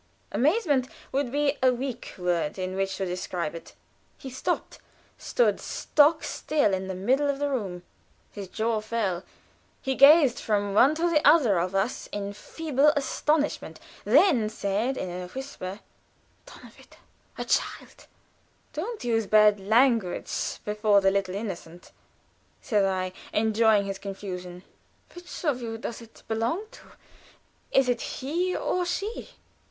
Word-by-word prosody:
Amazement 290 - +2 0.2
would 270 -2 -1
be 290 0 0
a 255 0 +5
weak 250 -1 -5
word 175 -4 -1
in 185 0 -3
which 195 0 -1
to 190 - -2
describe 180 -3 -3
it. 165 - -10 0.4
He 265 - -9
stopped, 260 - -3 0.4
stood - - +1
stock 310 +2 +2
still 290 -10 0
in 190 0 -2
the 190 - -4
middle 260 +10 +1
of 280 - 0
the 285 0 -1
room; 190 -9 -3 0.5
his 200 -2 -7
jaw 220 +2 -1
fell 210 -5 -2 0.6
he 265 - -2
gazed 280 -1 +6
from 205 -2 0
one 265 +9 +5
to 335 +2 +1
the 320 -3 +3
other 245 - +5
of 180 +3 -2
us 195 +5 -1
in 200 0 -4
feeble 295 +5 0
astonishment, 290 - -1 0.2
then 250 - +4
said, 215 +5 -1
in 185 - -4
a 180 0 -6
whisper: 210 -4 -7 0.7
"Donnerwetter! - - -15 0.4
A - - -4
child!" - - -2 0.7
"Don't 415 +9 -5
use 225 -3 0
bad 210 -1 +5
language 225 -1 +1
before 210 -1 +3
the 195 0 +4
little 195 -1 -1
innocent," 175 -5 -7 0.7
said 205 -3 +1
I, 185 -1 -1 0.2
enjoying 220 -1 +3
his 195 0 -5
confusion. 185 -3 -7 0.5
"Which 350 0 -9
of 270 -5 +1
you 225 -1 -4
does 235 +1 -6
it 230 -1 -16
belong 230 - -1
to? - - -15 0.8
Is 270 -1 +4
it 245 -1 0
he 345 +7 -2
or 360 - -1
she?" 395 +5 -4
225 Hz, 140 wpm, -26 LUFS, 195-280 Hz, 0.8 s, gazed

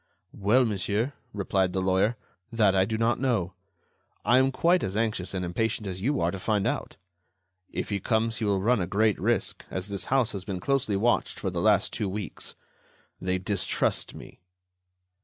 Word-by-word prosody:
"Well, 110 +6 +3
monsieur," 105 +5 -1 0.2
replied 95 -2 0
the 95 - 0
lawyer, 95 +5 +2 0.3
"that 110 -4 +3
I 95 0 +4
do 110 +2 -2
not 115 +1 +1
know, 115 -9 0 0.7
but - - -5
I 125 - +7
am 135 0 +3
quite 170 +7 +3
as 95 +2 -2
anxious 105 -5 -1
and 90 -1 -1
impatient 105 +4 -1
as 95 -1 -5
you 140 +7 +1
are 85 +1 +2
to 95 - -5
find 105 0 0
out. - - -2 0.7
If - - -4
he 100 -2 -1
comes, 115 +2 0
he 110 - -2
will 100 -2 +1
run 120 -1 +3
a 90 - -1
great 105 +2 +2
risk, - - 0
as 95 +2 -5
this 100 -1 -3
house 130 -3 +2
has 100 -2 -5
been 95 -1 -4
closely 130 -2 0
watched 115 +5 +1
for - - -2
the - - -2
last - - +3
two 100 - -1
weeks. 100 -2 -5 0.7
They 95 0 0
distrust 100 +1 -1
me." - - -12
105 Hz, 190 wpm, -27 LUFS, 95-115 Hz, 0.7 s, I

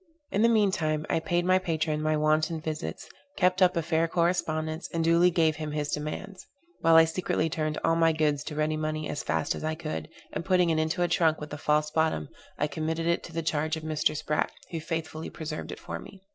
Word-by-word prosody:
In 200 - +1
the 230 - +5
mean 215 -4 +4
time, 155 -3 -1
I - - +2
paid 175 +2 0
my 185 +1 +4
patron 160 -4 -1
my 155 0 +1
wonted 155 +1 +1
visits, 150 - -4 0.3
kept 185 0 +2
up 185 -1 +5
a 165 - +1
fair 165 0 +1
correspondence, 165 -2 0
and 165 -1 0
duly 170 +2 +5
gave 160 -3 +2
him 155 -1 -4
his 150 -1 -2
demands; 155 +6 -4 0.4
while 165 -2 +5
I 165 0 +9
secretly 160 -1 -1
turned 155 -1 -1
all 165 - +3
my 165 0 +4
goods 150 -2 +1
to 150 - -5
ready 155 +1 0
money 155 0 -2
as 145 - -3
fast - - 0
as - - -7
I 155 0 -1
could, 155 -1 -5 0.2
and - - -3
putting 180 -2 +3
it 160 - +1
into 160 +3 0
a - - +2
trunk 160 -2 +2
with 150 0 -7
a - - -4
false 150 +1 +1
bottom, 160 - 0 0.3
I - - +1
committed 160 +2 -2
it 170 0 +1
to - - -10
the 165 0 -3
charge 155 0 0
of 160 - -8
Mr. 155 -1 0
Sprat 150 0 -1 0.2
who 165 - -3
faithfully 160 0 -4
preserved 155 -1 -6
it - - -7
for - - -6
me. 190 -1 -13
160 Hz, 230 wpm, -28 LUFS, 155-170 Hz, 0.4 s, I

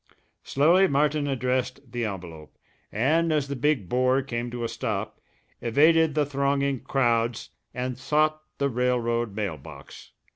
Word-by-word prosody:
Slowly 170 +7 +4
Martin 145 0 +1
addressed 130 -1 -2
the 120 -1 -2
envelope, 85 -6 -8 0.3
and 160 +9 +2
as 150 -3 +1
the 140 - -2
big 130 -6 0
bore 130 +4 +2
came 120 -2 -4
to 120 0 -5
a - - 0
stop, - - -4 0.4
evaded 155 +6 +4
the 150 -1 +2
thronging 140 -1 0
crowds 120 -3 0 0.2
and 125 0 -4
sought 155 +2 +1 0.2
the 140 - +1
railroad 120 -3 0
mail 100 -7 -3
box. 70 -1 -13
130 Hz, 140 wpm, -26 LUFS, 120-145 Hz, 0.4 s, Slowly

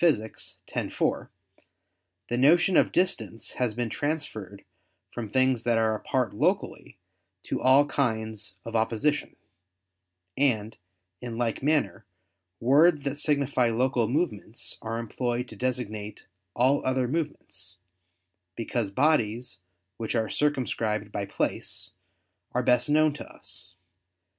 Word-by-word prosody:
_ 165 -10 +4
x, 110 - -7 0.4
4, - - 0 1.0
"the 120 - -1
notion 165 +8 +5
of - - +5
distance 115 - -1
has 115 -4 +1
been 120 0 -1
transferred 125 - -3 0.5
from 115 -3 -5
things 130 +1 +2
that 120 -1 +2
are 110 -1 +3
apart 120 +1 -1
locally, - - -1 0.5
to - - -3
all 135 +3 +6
kinds 110 -8 -2
of 115 0 -5
opposition": 115 +7 +1 1.0
and 115 -6 +1 0.5
in 120 -2 -5
like 115 -2 -1
manner 145 -7 +1 0.6
words 145 +5 +5
that 140 -1 -1
signify 140 -5 +2
local 120 0 +1
movement 120 - -2
are 115 +1 -3
employed 120 +2 -2
to 110 - -11
designate 110 -3 -3 0.3
all 130 +4 +3
other 130 -1 +1
movements, 120 - -4 0.8
because 115 -2 -2
bodies 120 - +1 0.4
which 115 +1 -3
are 110 -2 +1
circumscribed 115 -7 0
by 100 -1 -3
place, - - -3 0.6
are - - +1
best 125 +4 +3
known 155 0 +4
to 145 - -7
us. 90 +1 -5
120 Hz, 120 wpm, -27 LUFS, 110-140 Hz, 1.0 s, all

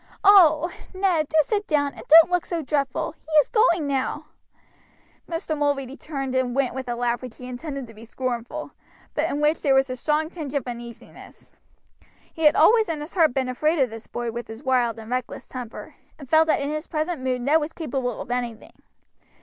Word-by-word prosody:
Oh! 345 -5 +6 0.2
Ned, 360 -6 +1
do 315 - 0
sit 415 +6 -2
down, 285 -2 +1
and - - -11
don't 330 +3 +8
look 355 -1 0
so 335 -2 -2
dreadful; 275 -2 -1
he 315 - -15
is 300 -3 +5
going 395 -9 +3
now." 280 +2 -2 1.0
Mr. 330 -2 -2
Mulready 280 -3 -1
turned 275 -4 -5
and 255 -1 0
went 275 -3 +1
with 260 -1 -5
a 240 - -1
laugh 240 0 -1
which 250 -3 -9
he 250 - -9
intended 275 +2 -6
to 225 - -14
be 215 +1 -13
scornful, 240 0 -4 0.4
but - - 0
in 290 - -2
which 300 +2 +2
there 275 -3 +3
was 270 -1 +2
a - - -3
strong 305 +5 -1
tinge 300 -5 -6
of 280 - -1
uneasiness. 235 -1 -10 0.8
He 320 - -2
had 300 - +6
always 445 -3 +5
in 320 -2 -2
his 300 +4 -8
heart 320 -8 +3
been 265 -1 0
afraid 305 +6 0
of 260 -5 +1
this 225 0 -9
boy 240 -1 -4
with 235 +1 -6
his 225 +4 -10
wild 245 -4 +1
and 225 +1 -10
reckless 250 -1 -4
temper, 245 -3 -8 0.2
and 280 - -11
felt 320 +3 +4
that 310 - +2
in 280 +1 -2
his 305 +1 -4
present 315 -1 -2
mood 255 -1 -1
Ned 300 +6 +3
was 300 +2 -3
capable 270 -8 -3
of 240 - -7
anything. 240 -3 -5
280 Hz, 205 wpm, -24 LUFS, 250-315 Hz, 1.0 s, don't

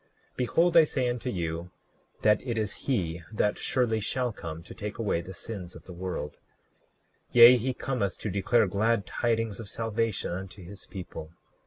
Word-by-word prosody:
Behold, 165 +8 +2
I 165 - +9
say 130 -4 0
unto 120 +1 -2
you, 85 -3 -3 0.5
that 105 0 +5
it 120 -3 -3
is 105 -2 -1
he 90 -10 0
that 105 -1 +1
surely 120 -4 +1
shall 125 +2 -1
come 85 -4 -7
to - - -10
take 105 0 -6
away 105 -7 0
the 95 +2 -9
sins 90 -3 -7
of 85 - -11
the 90 - -10
world; 85 -4 -4 1.0
yea, 120 +1 +10
he 125 +2 0
cometh 125 -8 -2
to 105 - -2
declare 105 +4 +3
glad 100 +2 +1
tidings 115 0 -1
of 110 -3 -7
salvation 115 -3 -1
unto 95 +1 -6
his 100 +3 -11
people. 85 -4 -8
105 Hz, 170 wpm, -28 LUFS, 90-120 Hz, 1.0 s, yea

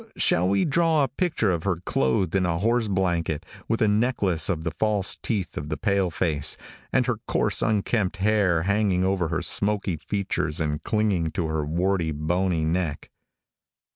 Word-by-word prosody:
Shall 90 +2 +2
we 100 0 +2
draw 160 0 +2
a - - +2
picture 160 - 0
of 85 -2 -1
her 95 +1 0
clothed 80 +7 +1
in 95 -1 +2
a 85 -2 0
horse 115 +4 +1
blanket, 90 -5 -1 0.2
with 115 - +1
a - - +4
necklace 105 -6 +1
of 80 -4 -1
the 85 - -2
false 100 +3 +1
teeth 100 -5 -3
of 75 0 -5
the 75 - -2
pale 100 +2 +1
face, 75 -2 +1 0.3
and - - +2
her - - -1
coarse - - +1
unkempt 105 -2 0
hair 95 -4 +2
hanging 100 -1 +1
over 95 -2 +1
her 85 0 -2
smoky 100 -4 0
features 95 -3 -2
and 75 -1 -2
clinging 105 -7 0
to 85 - -1
her 80 -1 -1
warty, 85 +2 0
bony 80 +2 0
neck? 80 -3 -2
95 Hz, 170 wpm, -25 LUFS, 80-105 Hz, 0.3 s, a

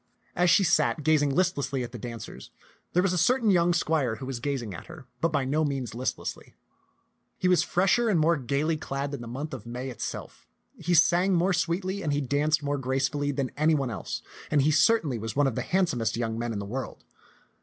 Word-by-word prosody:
As 175 0 +3
she 195 - +5
sat, 170 -3 +2
gazing 150 -1 +3
listlessly 140 -5 0
at 120 - -6
the 120 - -8
dancers, 115 0 -8 0.4
there 180 - +3
was 190 -2 +1
a 180 - +1
certain 230 +5 +3
young 175 -2 +4
squire 155 -8 +1
who 120 - -8
was 130 -2 -4
gazing 125 -6 -3
at - - -9
her, 140 - -11 0.2
but 165 - +2
by 140 -4 0
no 150 +4 +1
means 135 -5 -2
listlessly. 125 +3 -4 0.8
He 185 - 0
was 180 -1 +4
fresher 195 +6 +2
and 185 -6 +3
more 165 +2 +4
gayly 140 +4 -1
clad 140 -1 -4
than 140 - -5
the 120 - -7
month 135 +6 -5
of 120 -4 -7
May 125 +2 -5
itself. 120 - -7 0.3
He 175 +2 0
sang 180 +3 +4
more 180 +3 +2
sweetly 185 +3 -1
and 150 -5 -1
he 145 - +1
danced 145 +2 +1
more 145 0 -1
gracefully 135 +2 0
than 135 -2 -2
any 155 +2 +3
one 135 -4 -1
else, 105 - -5 0.3
and 145 -3 +3
he 155 - +3
certainly 155 - +3
was 110 0 -5
one 145 +1 +3
of 135 - +1
the - - -2
handsomest 160 - 0
young 115 -2 -2
men 120 +1 -3
in 110 - -3
the 100 - -4
world. 125 +5 -6
145 Hz, 215 wpm, -27 LUFS, 130-170 Hz, 0.8 s, she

